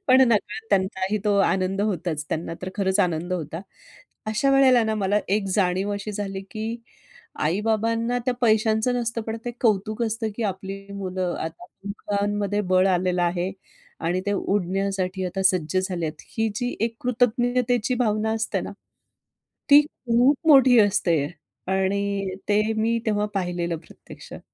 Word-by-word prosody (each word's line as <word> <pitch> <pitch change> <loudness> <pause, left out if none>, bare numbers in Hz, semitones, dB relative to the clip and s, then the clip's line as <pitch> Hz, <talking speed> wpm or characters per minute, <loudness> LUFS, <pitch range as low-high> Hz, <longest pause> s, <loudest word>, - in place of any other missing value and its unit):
पण 260 +1 +7
नकळत 220 0 -1
त्यांचाही 190 +1 +1
तो 205 - +2
आनंद 195 0 +1
होताच. 175 -7 -1
त्यांना 165 +1 -3
तर 185 - -3
खरंच 190 -1 +1
आनंद 175 -1 0
होता. 165 -1 -4 0.7
अशा 215 +6 +1
वेळेला 265 -3 +5
ना 220 0 0
मला 205 0 +1
एक 200 0 +1
जाणीव 190 +1 +1
अशी 205 +1 -4
झाली, 195 -1 -4
की 220 +1 -4 0.6
आई-बाबांना 225 +7 0
त्या 255 - 0
पैशांचं 220 +1 +2
नसतं 235 -1 -1
पण 225 0 -3
ते 240 - -2
कौतुक 215 0 +1
असतं, 225 0 -1
की 235 - -3
आपली 195 +1 -8
मुलं 185 -2 -3
आता 160 +2 -6 0.2
दोघांमध्ये 205 0 -1
बळ 185 +1 +5
आलेलं 180 -1 +1
आहे 175 +2 0 0.5
आणि 175 +2 0
ते 205 - +1
उडण्यासाठी 190 -1 -1
आता 190 +2 -3
सज्ज 185 -3 +2
झाले 180 -3 -2
आहेत. 155 0 -7 0.2
ही 225 0 +2
जी 245 +1 -2
एक 230 0 -1
कृतज्ञतेची 245 0 +1
भावना 220 -3 0
असते 225 0 -1
ना, - - -6 1.0
ती 285 +1 +10
खूप 255 0 +2
मोठी 260 -4 +7
असते 200 -5 +2 0.6
आणि 195 0 0
ते 210 +1 +3
मी 230 +1 +1
तेव्हा 210 -1 +1
पाहिलेलं 175 -3 -1
प्रत्यक्षात. 160 - -13
205 Hz, 145 wpm, -24 LUFS, 185-225 Hz, 1.0 s, ती